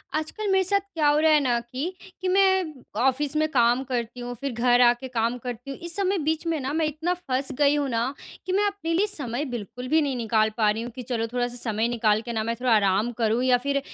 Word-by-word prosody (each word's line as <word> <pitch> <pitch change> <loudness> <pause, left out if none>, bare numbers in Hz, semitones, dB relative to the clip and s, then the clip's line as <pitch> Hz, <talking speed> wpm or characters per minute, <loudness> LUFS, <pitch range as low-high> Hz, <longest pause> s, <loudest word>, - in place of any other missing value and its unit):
आजकल 315 +7 -3
मेरे 380 0 +4
साथ 400 +2 +2
क्या 310 -3 +2
हो 295 0 +4
रहा 315 0 +4
है 305 - +6
ना, 245 -4 +1
कि 260 +10 -5 0.3
कि 375 - -2
मैं 380 -3 +3 0.3
ऑफ़िस 265 +3 +1
में 310 - +2
काम 245 0 +3
करती 240 -1 -3
हूँ 245 0 -5
फिर 275 +4 -4
घर 245 +1 +3
आ 240 -1 +7
के 250 +2 -9
काम 235 -1 -1
करती 245 +2 -7
हूँ। 275 - -7
इस 340 0 -4
सब 395 - 0
में 380 -4 0
बीच 315 +2 -1
में 325 -2 0
ना 265 0 -3
मैं 320 0 +1
इतना 310 +4 -1
फँस 275 -6 -3
गई 290 0 +4
हूँ 290 -1 0
ना 235 +2 -1 0.3
कि 370 - -3
मैं 405 +2 +3
अपने 395 -5 -3
लिए 385 +5 +2
समय 285 - -2
बिल्कुल 240 +2 -6
भी 315 +4 +3
नहीं 280 -3 -1
निकाल 220 -2 +2
पा 215 -2 +3
रही 220 +2 -1
हूँ 240 - -6
कि 255 - -6
चलो 230 -1 -2
थोड़ा-सा 245 -1 -1
समय 220 +2 0
निकाल 220 -3 +1
के 235 +1 -6
ना 220 -1 -1
मैं 230 +1 -2
थोड़ा 250 -1 +1
आराम 205 +2 +2
करूँ 225 +2 +2
या 255 -1 +4
फिर 280 0 +2
260 Hz, 260 wpm, -25 LUFS, 235-315 Hz, 0.3 s, आ